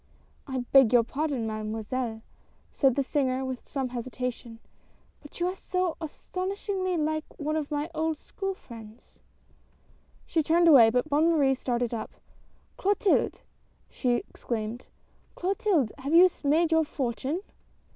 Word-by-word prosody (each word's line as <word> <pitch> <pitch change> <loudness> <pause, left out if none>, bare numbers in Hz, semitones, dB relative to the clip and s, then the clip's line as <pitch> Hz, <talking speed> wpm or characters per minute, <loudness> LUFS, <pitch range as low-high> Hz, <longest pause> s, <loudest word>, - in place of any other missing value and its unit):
" - - -36
I 260 -2 -3
beg 270 -5 +7
your 240 -2 +6
pardon, 275 -1 -2
Mademoiselle," 220 +2 -3 0.5
said 270 -4 +2
the 280 - +1
singer 265 -2 0
with 260 -1 -6
some 265 -3 -2
hesitation, 245 -1 -5 0.3
" - - -36
but 295 - -12
you 345 - +1
are 365 - 0
so 365 -2 -1
astonishingly 370 +3 -3
like 310 0 0
one 305 +1 -2
of 305 -2 -2
my 295 0 -2
old 315 0 -1
school 390 +5 -5
friends 225 -5 -13 0.5
" - - -34
She 325 - +1
turned 335 +3 +3
away, 255 -8 +8
but 250 +5 0
Bonne 305 +3 +3
Marie 285 -5 +3
started 245 -2 -2
up. 220 -2 -4 0.4
" - - -37
Clotilde! 400 0 +1 0.3
" - - -38
she 250 -2 0
exclaimed, 225 +1 -5 0.2
" - - -36
Clotilde! 375 - +1
Have 280 +5 -1
you 360 +2 +9 0.2
made 315 +4 +3
your 320 0 +4
fortune 275 +3 -3
280 Hz, 155 wpm, -27 LUFS, 245-325 Hz, 0.5 s, you